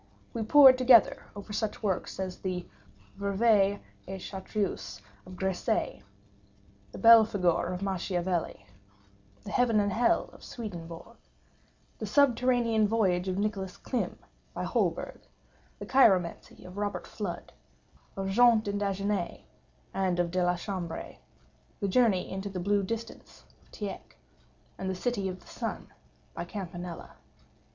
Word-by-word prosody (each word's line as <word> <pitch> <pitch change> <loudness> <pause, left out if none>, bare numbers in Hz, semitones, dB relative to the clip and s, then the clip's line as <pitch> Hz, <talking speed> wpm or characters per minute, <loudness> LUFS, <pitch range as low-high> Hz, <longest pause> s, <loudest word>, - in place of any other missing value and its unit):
We 230 - -3
pored 260 +3 +7
together 250 -3 +5
over 205 +1 -8
such 215 +1 -3
works 190 -2 -2
as 185 -1 -4
the 180 -2 -3 0.5
Ververt 200 0 +2 0.3
et 190 +1 -6
Chartreuse 195 +1 -4 0.3
of 185 - -10
Gresset; 190 0 -1 0.9
the - - -9
Belphegor 215 -7 +5
of 180 +1 -4
Machiavelli; 180 - -2 0.8
the - - -7
Heaven 235 -3 +3
and 205 -1 +1
Hell 235 +3 +2
of - - -16
Swedenborg; 175 -1 -8 0.8
the - - -4
Subterranean 245 -5 +3
Voyage 190 -5 +1
of 185 0 -1
Nicholas 200 -3 -2
Klimm 245 - -3 0.4
by - - -3
Holberg; - - -1 0.6
the - - -7
Chiromancy 190 -10 +2
of 180 +2 -11
Robert 205 0 -3
Flud, 185 -5 -6 0.7
of 195 0 -2
Jean 235 +2 +6
D'Indaginé, 200 0 -2 0.5
and 185 -2 0
of 175 -1 0
De 185 0 +1
la 175 0 +2
Chambre; 175 -2 -5 0.6
the 200 - -1
Journey 200 -3 +3
into 190 +1 -5
the 190 -2 -5
Blue 200 +3 +1
Distance 230 +3 -7 0.2
of - - -28
Tieck; 205 -2 -7 0.6
and 190 - -3
the 190 - -2
City 200 -1 -1
of 185 0 -7
the - - -21
Sun - - -6 0.4
of - - -5
Campanella. 175 -4 -7
200 Hz, 130 wpm, -29 LUFS, 185-220 Hz, 0.9 s, pored